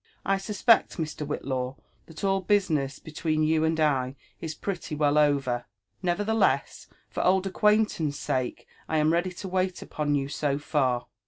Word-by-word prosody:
I 195 0 +2
suspect, 210 +3 +3
Mr. 155 -2 -4
Whillaw, 130 -3 -3 0.3
Ih^t 160 +2 -10
all 195 -1 +2
business 160 -8 +1
between 155 0 -1
you 155 0 +2
and 160 0 +1
I 135 -4 +1 0.2
is 160 -1 -5
pretty 180 -6 -4
well 145 -1 +2
over; 135 -5 +1 0.3
nevertheless, 190 -5 +1 0.2
for - - -3
old 190 +1 +3
acquaintance' 205 -7 +2
sake, 130 -1 -2 0.2
I 160 - +1
am 155 +1 +3
ready 175 +2 +1
to 190 +2 -7
wait 185 0 -1
upon 145 -1 -1
you 135 -1 0
so 140 0 -1
far." 130 -5 0
155 Hz, 155 wpm, -27 LUFS, 145-185 Hz, 0.3 s, suspect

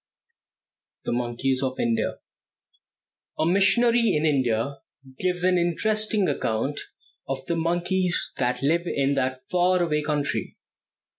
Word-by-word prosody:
THE - - -1
MONKEYS 125 +2 -1
OF 130 -1 -2
INDIA. 115 -2 0 1.2
A 155 - +1
missionary 230 +6 +3
in 150 +1 +1
India 135 -2 0 0.4
gives 180 -1 -1
an 180 -1 +3
interesting 210 +4 +1
account 115 +6 -1 0.5
of 135 -1 -3
the 170 - -1
monkeys 175 +2 0
that 125 +1 0
live 170 +5 +1
in 140 -2 +1
that 130 -1 -1
far 180 0 +3
away 150 -3 0
country. 150 -1 -2
155 Hz, 120 wpm, -25 LUFS, 130-180 Hz, 1.2 s, missionary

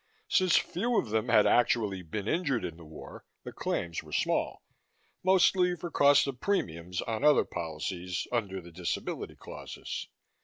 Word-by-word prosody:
Since 185 -3 +4
few 230 +7 +1
of 110 - 0
them 110 +2 0
had 110 -3 +6
actually 115 -5 +2
been 100 +5 -5
injured 145 -7 0
in 80 - -5
the 85 - -13
war, 80 -1 -11 0.2
the - - -7
claims 85 -1 -2
were 80 - -15
small - - 0 0.6
mostly 185 -1 +4
for 170 0 -7
cost 145 0 +5
of 135 -3 -5
premiums 90 - -2
on 115 +3 -3
other 150 -1 +5
policies, 85 +3 -4
under 100 -6 -1
the 85 0 -13
disability 85 +1 -4
clauses. - - -7
110 Hz, 155 wpm, -30 LUFS, -, 0.6 s, had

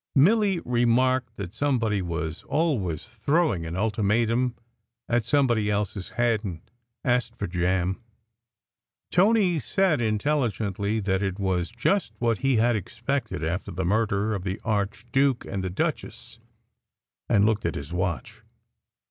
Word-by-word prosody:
Milly 195 +5 +4
remarked 120 0 +2
that 95 -4 -6
somebody 115 -8 +1
was 80 -2 -3
always 130 - 0
throwing 120 - 0
an 80 - -5
ultimatum 115 +4 +1 0.5
at 120 -1 +1
somebody 120 -7 +2
else 105 -1 -1
s 95 -3 -6
head, 120 -3 +1
and 90 -6 -5 0.4
asked 125 -1 +1
for 100 - -2
jam. 90 +3 0 1.1
Tony 190 -3 +4
said 175 - +1
intelligently 110 -3 0
that 95 -1 0
it 95 -2 -2
was 95 -3 0
just 185 - 0
what 115 -3 +1
he 135 -1 +2
had 115 +1 +3
expected, 115 - -3
after 80 +4 -2
the 95 +1 -3
murder 105 +1 +1
of 100 -3 -3
the 95 +2 -3
archduke 115 +5 0
and 95 -1 -4
the 95 - -2
duchess, 90 - -3 0.9
and 100 -1 +4
looked 110 -1 +1
at 85 - -3
his 70 +4 -6
watch. 90 -6 -3
110 Hz, 135 wpm, -26 LUFS, 95-125 Hz, 1.1 s, Milly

